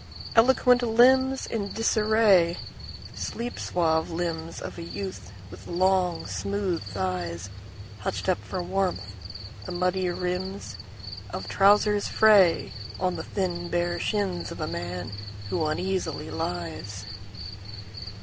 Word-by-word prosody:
Eloquent 250 +1 +5
limbsIn 245 -2 +3
disarraySleep 215 +1 +1
suave 160 -2 +1
limbs 165 -1 -3
of - - -7
a - - -5
youth 185 - -6 0.2
with 90 +1 -11
long, 180 0 +2
smooth 200 -4 -2
thighsHutched 95 - -5
up 185 - +2
for 185 -2 -4
warmth; 185 - -1 0.5
the - - -4
muddy 180 +1 0
rimsOf 180 +2 -3 0.7
trousers 205 +1 +4
frayOn 180 - +3
the - - -4
thin 175 -3 -2
bare 175 0 0
shins 195 -5 -1
of - - -7
a 155 - -1
man 90 - -4 0.4
who 170 - +1
uneasily 185 +5 -2
lies. 90 +3 -4
180 Hz, 100 wpm, -27 LUFS, 120-200 Hz, 0.7 s, Eloquent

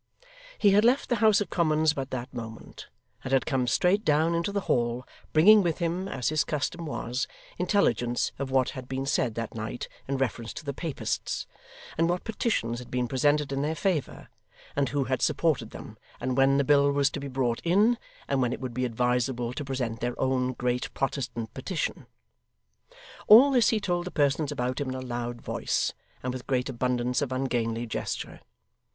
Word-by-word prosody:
He 205 - +4
had 205 +2 +5
left 250 +4 +3
the 240 - +2
House 215 -1 +4
of 200 - -3
Commons 155 -2 +2
but 135 -3 -4
that 125 0 -5
moment, 115 -2 -8 0.4
and 130 - -5
had 135 -1 +3
come 130 -4 0
straight 180 - +2
down 155 +1 +3
into 170 +4 0
the 200 0 -1
Hall, 120 -4 0 0.3
bringing 210 +7 +7
with 170 -4 0
him, 175 +2 -1
as 125 - -1
his 155 -1 +2
custom 155 +3 -3
was, 125 -2 -2 0.3
intelligence 175 - +1
of 140 -1 -3
what 130 -1 +2
had 130 -2 -8
been 135 +1 -3
said 125 -4 0
that 115 -1 -4
night 110 +2 -5 0.2
in 135 0 -1
reference 120 -3 -2
to 155 - -8
the 140 - -2
Papists, 160 +1 -3 0.5
and 165 +1 +3
what 175 +1 -1
petitions 205 - -1
had 125 - -10
been 125 -1 -1
presented 145 +3 +1
in 135 0 -1
their 155 +3 -1
favour, 175 -6 -2 0.5
and 140 -2 +1
who 140 +1 0
had 130 0 -1
supported 145 -9 +1
them, 110 - -10 0.2
and 130 +1 -1
when 135 +1 +4
the 140 - +3
bill 140 0 +4
was 140 0 +2
to - - -4
be 140 - -5
brought 125 -3 -1
in, 210 +7 +3 0.3
and 135 -1 +1
when 125 -2 +1
it - - -5
would 130 -2 -5
be 125 +2 -1
advisable 125 0 0
to 145 - -4
present 125 -5 -3
their 120 0 -3
own 130 -1 +1
Great 125 0 -2
Protestant 130 -4 -3
petition. 155 +5 -3 1.2
All 250 +7 +9
this 245 -5 +4
he 220 - +2
told 175 -3 -1
the - - -3
persons 145 -1 +1
about 125 -1 -2
him 140 - -2
in 130 - -3
a - - -4
loud 120 -1 -4
voice, - - -1 0.3
and 125 0 -2
with 130 -1 -7
great 130 0 0
abundance 125 +1 0
of 140 -3 -2
ungainly 120 -3 -1
gesture. 115 - -4
135 Hz, 195 wpm, -27 LUFS, 125-160 Hz, 1.2 s, All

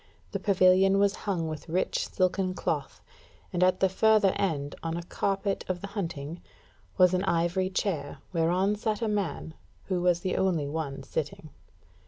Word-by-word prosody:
The - - -2
pavilion 190 0 +4
was 200 0 +3
hung 170 -4 0
with 155 +1 -6
rich 180 +3 0
silken 185 0 0
cloth, - - -3 0.5
and 175 - -1
at 185 0 +3
the 190 - +5
further 210 +1 +4
end, 145 -7 -1
on 165 0 -3
a 170 - -4
carpet 195 +2 -1
of 180 -1 -2
the - - -4
hunting, 165 -5 -4 0.6
was 180 -1 +6
an 185 +1 +1
ivory 175 +2 +1
chair, 165 -7 -2 0.2
whereon 180 +5 +2
sat 215 +1 -2
a - - +1
man, 195 -6 -2 0.4
who 180 -2 0
was 175 -1 +2
the 185 - -1
only 175 -6 +1
one 145 -2 -4
sitting. 155 0 -4
185 Hz, 165 wpm, -28 LUFS, 165-195 Hz, 0.6 s, was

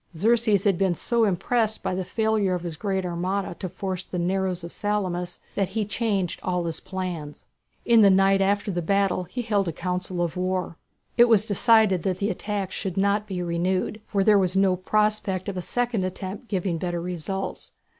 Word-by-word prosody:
Xerxes 220 0 +3
had 195 -4 +2
been 190 -3 +2
so 230 +7 +1
impressed 220 +3 0
by - - -1
the 185 +1 -2
failure 215 -1 +1
of 175 - -5
his 170 -2 -4
great 190 0 -2
armada 180 +3 -2
to 185 - -4
force 190 0 -4
the 180 - -6
narrows 180 0 -1
of 170 - -7
Salamis 185 -4 -2
that 195 -2 0
he 220 +3 -2
had 210 0 -4
changed 200 -6 -1
all 180 -1 -1
his 165 -1 -4
plans. 180 -6 -6 0.4
In 230 -2 +6
the 200 - +7
night 195 0 +4
after 200 +1 +1
the 175 -1 -2
battle 195 +1 +1
he 245 +8 -5
held 205 -4 +1
a - - 0
council 180 +1 -2
of 170 0 -3
war. 185 -2 -2 0.4
It 240 - +8
was 215 -2 +5
decided 215 -3 +4
that 185 0 -1
the 205 +2 0
attack 200 -3 -3
should 190 -2 -4
not 200 +2 +1
be 180 -3 -3
renewed, 180 +5 -1
for 200 -2 +1
there 210 0 +5
was 185 -1 +1
no 190 -1 +4
prospect 210 0 0
of 200 - -3
a 180 - -2
second 240 0 -1
attempt 190 +4 -5
giving 185 -5 -1
better 175 0 -2
results. 180 +2 -4
190 Hz, 195 wpm, -25 LUFS, 180-205 Hz, 0.4 s, It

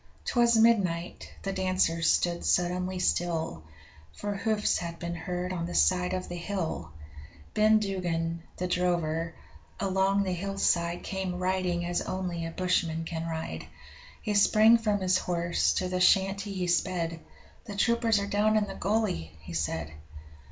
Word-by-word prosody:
'Twas 235 -1 +3
midnight 195 -7 +2
the 195 - -2
dancers 185 -3 +1
stood 170 -1 +1
suddenly 180 +1 +1
still, 165 - 0 0.5
For 205 - -4
hoofs 210 +1 0
had 170 -1 -5
been 170 0 -4
heard 180 +2 -3
on 170 -2 -3
the 175 - -6
side 180 0 +3
of 185 - -4
the 175 - -6
hill! 175 - -3 0.6
Ben 215 +1 +5
Duggan, 170 -5 -2 0.2
the 180 - -2
drover, 170 -2 0 0.4
along 195 +1 +2
the 185 -2 -1
hillside 175 -2 0
Came 190 -2 -3
riding 180 -1 0
as 175 0 -1
only 180 -3 -3
a - - -4
bushman 165 -2 0
can 165 0 -4
ride. 160 -1 -5 0.6
He 210 - -1
sprang 215 +3 +6
from 210 -3 0
his 185 0 +3
horse, 170 - 0
to 185 - -1
the 180 0 -2
shanty 195 +2 +3
he 185 -2 -2
sped 175 -1 0 0.5
'The 205 - -7
troopers 230 +1 +2
are 200 - 0
down 210 +2 +2
in 210 - +2
the 195 - -7
gully!' 195 - -1
he 85 +2 -9
said. 80 -1 -2
180 Hz, 150 wpm, -28 LUFS, 170-195 Hz, 0.6 s, sprang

